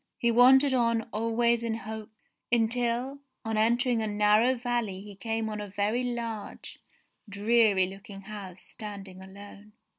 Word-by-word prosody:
He 235 - +1
wandered 260 +3 +6
on 230 -2 +2
always 230 +2 +1
in 230 -1 -2
hopes, 220 -1 -7 0.4
until 240 +3 0 0.3
on 225 0 -2
entering 235 +2 +2
a 220 - -1
narrow 210 +4 +3
valley 240 -5 -2
he 205 0 -10
came 225 +2 -3
on 210 -1 -4
a 205 - -6
very 205 +5 -1
large, 230 -4 -5 0.5
dreary 205 -1 +3
looking 195 +1 -10
house 195 -3 -9
standing 200 -4 -9
alone. 200 +2 -13
225 Hz, 140 wpm, -28 LUFS, 205-235 Hz, 0.5 s, wandered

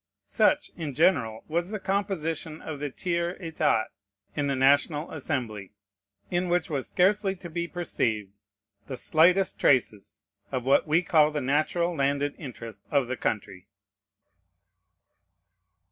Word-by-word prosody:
Such, 300 0 +2
in 150 -6 -5
general, 125 -9 +2
was 170 +3 -1
the 215 0 -4
composition 175 -6 -2
of 155 -3 -7
the 145 0 -3
Tiers 170 +4 -2
État 155 -9 +1 0.5
in 145 -1 0
the 140 - 0
National 145 +4 +2
Assembly; 120 - -4 0.6
in 180 0 0
which 175 -1 0
was 140 -3 -2
scarcely 195 +1 +2
to 175 -2 -10
be 170 +1 -2
perceived 115 - -2 0.6
the 130 - -5
slightest 180 +8 +3
traces 110 -6 +1 0.3
of 125 -2 -2
what 135 +4 +3
we 160 +4 +3
call 155 -3 +4
the 150 -1 -2
natural 155 +6 +1
landed 140 0 0
interest 115 -7 -9
of 140 -3 +2
the 130 +2 -3
country. 95 -5 -3
150 Hz, 130 wpm, -27 LUFS, 130-175 Hz, 0.6 s, call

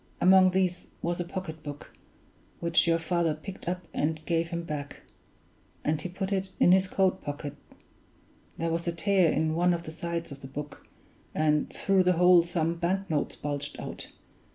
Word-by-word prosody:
Among 185 0 +7
these 185 -1 0 0.2
was 170 +1 -1
a - - 0
pocketbook, 160 -5 -7 0.7
which 170 0 +3
your 165 0 +4
father 165 -1 0
picked 180 +3 -7
up 180 0 -3
and 155 +1 -1
gave 165 -1 +1
him 170 0 -4
back; 150 -3 -6 0.8
and 155 0 0
he 180 - -4
put 190 +2 -4
it 190 0 -1
in 175 - +6
his 190 +1 +5
coat 190 0 +1
pocket 145 0 -5 1.0
there 165 0 -1
was 170 +1 -2
a 170 - 0
tear 175 0 +3
in 155 0 +1
one 175 +2 +3
of 170 - -6
the 155 - -7
sides 170 0 -4
of 140 0 -9
the 135 - -8
book, 145 +2 -8 0.5
and 150 -1 +2
through 195 -1 +2
the 180 0 +4
hole 180 0 +6
some 170 -1 -1
bank 185 +2 -1
notes 150 -2 -1
bulged 145 0 -4
out. - - -6
170 Hz, 175 wpm, -28 LUFS, 155-180 Hz, 1.0 s, Among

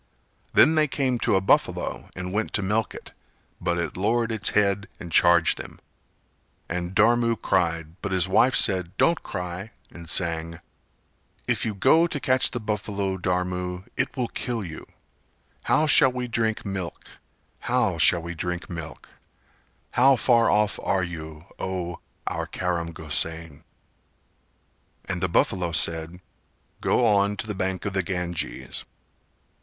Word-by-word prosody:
Then 155 - +6
they 155 -1 +3
came 130 -3 -1
to 105 - +1
a 95 - +3
buffalo 95 - 0
and 90 0 -5
went 105 +1 -2
to 105 - +1
milk 105 +3 -1
it, - - -11 0.5
but 85 -1 0
it 85 -3 -3
lowered 115 +4 0
its 110 -2 +1
head 100 0 +2
and 85 - -8
charged 85 0 +4
them; - - -9 0.9
and 90 +1 -4
Dharam 115 +2 +4
cried 85 -2 -1
but 100 - -4
his 95 -1 +1
wife 125 +7 +3
said 90 -3 +2
"Don't 170 -1 +3
cry" 90 +3 -6 0.2
and 85 -2 -9
sang: 85 0 -1 0.9
"If - - +1
you 105 - -3
go 160 - +4
to 150 - -3
catch 130 0 +2
the 120 - -4
buffalo, 100 -3 -2
Dharmu, 90 0 -2
It - - -2
will 125 -2 0
kill 115 -5 -4
you. 80 -2 -9 0.8
How 155 - +3
shall 150 -3 +7
we 125 0 -4
drink 110 -2 -1
milk? 95 -3 -5 0.5
How - - 0
shall 85 -1 +5
we 85 +1 -5
drink 90 +2 -4
milk? 80 -2 -8 0.8
How 135 +2 +5
far 120 -2 +3
off 105 -1 +2
are 95 -1 0
you, 80 -2 -7
O 90 -2 -4 0.3
our - - -3
Karam 85 -2 -2
Gosain?" 80 -1 -2 1.4
And 95 -2 -4
the 90 - 0
buffalo 90 0 +1
said 85 +2 0 0.6
"Go 125 - +2
on 100 -1 +2
to - - -4
the 105 - -4
bank 95 0 -3
of 100 - -2
the 95 - +1
Ganges." 90 -2 -3
95 Hz, 150 wpm, -25 LUFS, 85-110 Hz, 1.4 s, shall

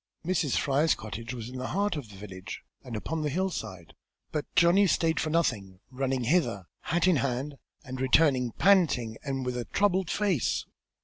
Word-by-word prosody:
Mrs. 165 -6 +1
Fry's 145 +3 +2
cottage 115 +3 -7
was 120 -3 -6
in 130 - -7
the 130 - -3
heart 200 -1 0
of 140 -8 -6
the 100 - -12
village, 95 0 -8 0.2
and 125 -4 -7
upon 160 +9 -3
the 150 - 0
hillside, 115 - -3 0.4
but 150 - -2
Johnny 180 +4 +5
stayed 165 -2 +2
for 155 - -1
nothing, 105 - 0
running 130 -1 -1
hither, 120 - +1
hat 175 +2 0
in 180 -4 +4
hand, 135 +2 -2 0.2
and 130 -2 -6
returning 130 -2 +3
panting, 155 - +3
and 135 -2 -3
with 125 -1 -2
a 120 -1 -3
troubled 190 -3 +1
face. 195 - 0
135 Hz, 175 wpm, -28 LUFS, 120-165 Hz, 0.4 s, Johnny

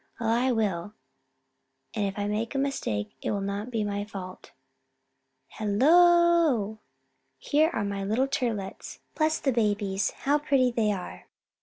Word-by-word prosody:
Well, 225 -1 -1
I 245 +3 +2
will, 205 -4 -1 1.0
and 210 -3 0
if 195 - -6
I 205 - -1
make 215 +5 -2
a - - +1
mistake 110 - -2
it - - -3
will 205 - -1
not 200 +3 -4
be 225 -3 -1
my 205 0 -2
fault. 190 -3 -9 1.0
Hello! 310 - +3 0.6
Here 300 - +2
are 225 - -2
my 200 0 -3
dear 195 - -3
little 245 +6 +1
Turtlets! 225 -8 -3 0.2
Bless 310 0 +1
the 270 - +1
babies, 205 -3 0 0.2
how 290 +2 +3
pretty 270 -4 +2
they 225 -3 +1
are! 185 -3 -7
220 Hz, 150 wpm, -27 LUFS, 200-270 Hz, 1.0 s, Hello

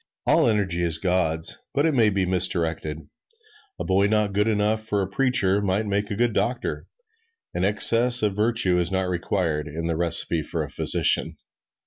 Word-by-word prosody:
All 160 - +3
energy 95 -5 -1
is 80 -2 0
God's, 85 -4 -2 0.2
but 145 - +1
it 160 - +1
may 115 -5 +3
be 95 -2 -1
misdirected. 80 -4 -2 0.7
A - - -3
boy 100 +2 +1
not 105 -2 0
good 105 +2 +1
enough 110 0 0
for 105 -2 -2
a - - -4
preacher 105 -3 0
might 100 +2 -1
make 100 0 -2
a 105 - -3
good 120 +1 0
doctor 120 +4 -3 0.7
an 90 - -2
excess 115 +4 +5
of 105 -2 0
virtue 105 -4 +1
is 85 +1 -2
not 95 -1 -1
required 85 -3 -2
in 80 +3 -6
the 85 -1 -2
recipe 85 0 +3
for - - -4
a - - -9
physician. - - 0
100 Hz, 175 wpm, -23 LUFS, 85-110 Hz, 0.7 s, excess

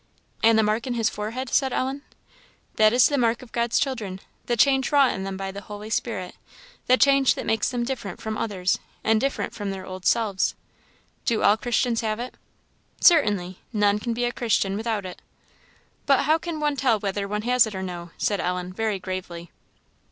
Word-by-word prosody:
"And 225 0 +5
the 220 - +4
mark 215 +4 0
in 245 - -2
his 225 -1 +1
forehead?" 230 +5 -4
said 265 +2 +2
Ellen. 265 +3 -2 0.8
"That 215 -1 +6
is 245 +2 +5
the 285 -2 0
mark 235 0 +1
of 245 - -15
God's 235 0 0
children 220 -9 -2 0.3
the 240 - 0
change 265 +1 +3
wrought 280 -3 +5
in 190 0 -5
them 195 -1 -4
by 195 0 -4
the 200 +1 -8
Holy 210 +1 -9
Spirit 195 -7 -2 0.5
the 255 - +5
change 275 -1 +4
that - - -5
makes 220 -2 +1
them 245 -1 -2
different 235 -6 -5
from 220 0 -4
others, 195 -5 -1 0.2
and 220 0 +3
different 275 0 -2
from 205 -2 -4
their 190 -1 -5
old 185 -1 -5
selves." 210 -5 +1 0.7
"Do 230 - +1
all 205 - +6
Christians 235 +1 0
have 215 -1 -2
it?" 250 +1 -5 0.7
"Certainly. 205 - +3
None 205 -2 +2
can 230 +1 -3
be 245 +1 0
a 240 - 0
Christian 210 -5 0
without 220 -2 -2
it." 180 - -8 0.9
"But 275 -1 +4
how 310 +3 +3
can 320 -1 -5
one 295 -1 0
tell 250 -5 +3
whether 200 0 -3
one 210 +1 -3
has 245 -1 +4
it 210 - -7
or 190 - -4
no?" 175 -2 -6
said 205 -2 0
Ellen, 180 0 -3
very 220 0 -1
gravely. 180 -3 -6
220 Hz, 195 wpm, -24 LUFS, 195-245 Hz, 0.9 s, That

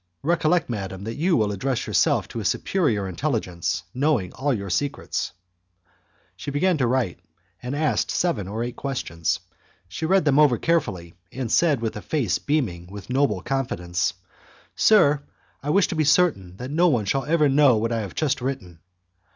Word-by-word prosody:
Recollect, 165 +1 +2
madam, 95 -4 -5
that 110 +2 -4
you 170 +7 +1
will 105 -3 +1
address 125 +5 -2
yourself - - +2
to - - -5
a - - -4
superior 120 - 0
intelligence 90 - -2
knowing 130 - 0
all 140 +2 -1
your 100 -6 -3
secrets" 145 +9 -2 1.0
She - - -6
began 170 +6 +2
to 125 - +2
write, 120 - 0 0.4
and 125 +3 -4
asked 155 0 0
seven 125 - 0
or 110 +4 -3
eight 120 0 -5
questions. 85 - -2 0.5
She 125 - -4
read 190 -2 +3
them 145 -1 +4
over 145 -6 +5
carefully, 110 - -1 0.2
and 125 -4 -4
said, 155 -8 +3
with 115 -1 -2
a 105 - -6
face 120 - 0
beaming 110 - -1
with 100 +3 -9
noble 125 -8 +1
confidence, 90 -10 -1 0.6
"Sir, 150 -10 +5 0.4
I 145 - -4
wish 195 +4 +4
to - - -3
be 155 - +2
certain 140 - +2
that 125 +4 -6
no 170 +4 +3
one 120 -10 +1
shall 135 +7 0
ever 155 -1 +3
know 135 -3 +5
what 115 +2 -1
I 115 - 0
have 100 -5 -6
just 150 -5 0
written." 125 -11 -5
130 Hz, 175 wpm, -24 LUFS, 100-150 Hz, 1.0 s, over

